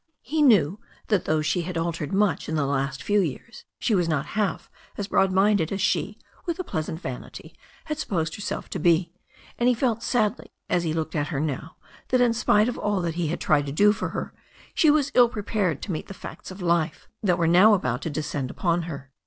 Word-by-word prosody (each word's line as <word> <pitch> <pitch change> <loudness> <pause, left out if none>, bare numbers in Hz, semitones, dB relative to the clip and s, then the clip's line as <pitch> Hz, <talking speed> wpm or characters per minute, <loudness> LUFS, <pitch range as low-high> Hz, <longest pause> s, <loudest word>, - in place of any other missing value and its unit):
He 305 +3 -1
knew 205 - +4 0.3
that 205 -5 +2
though 155 0 +1
she 155 +3 +1
had 175 0 -4
altered 165 -3 -2
much 195 -7 +1
in 160 - -1
the 150 -2 +1
last 135 -1 -2
few 205 +7 +2
years 185 - -4
she 225 - 0
was 175 -4 +2
not 150 -3 0
half 210 -3 -1 0.3
as 205 - -3
broad 195 -1 +2
minded 190 -3 +3
as 195 - -2
she, 195 - 0 0.3
with 340 - -1
a 370 - -3
pleasant 160 - -4
vanity, 130 -8 -8 0.3
had 305 -1 -4
supposed 165 - -1
herself 205 0 -4
to 190 - -3
be, 170 +1 +2 0.5
and 240 +1 +4
he 250 - +3
felt 230 -2 0
sadly, 225 -2 0 0.2
as 175 - +2
he 160 - 0
looked 160 0 -3
at 145 -1 0
her 150 -5 -3
now, 155 +1 -3 0.3
that 255 - +2
in 245 -2 +4
spite 215 -2 +3
of 245 - -3
all 205 -2 0
that 170 -2 -2
he 170 -1 -1
had 160 - -2
tried 145 -2 +2
to - - -3
do 205 +8 +5
for - - -3
her, - - -5 0.4
she 315 - +4
was 290 -2 +3
ill 245 -1 +6
prepared 205 - -2
to 200 - -4
meet 155 - -4
the 195 - -9
facts - - -9
of 185 0 -8
life 170 -2 0
that 180 -5 +2
were 170 - +1
now 185 +6 +6
about 125 -9 -2
to - - -3
descend 145 -3 -3
upon 175 +3 0
her. 140 -3 -8
175 Hz, 225 wpm, -25 LUFS, 155-210 Hz, 0.5 s, ill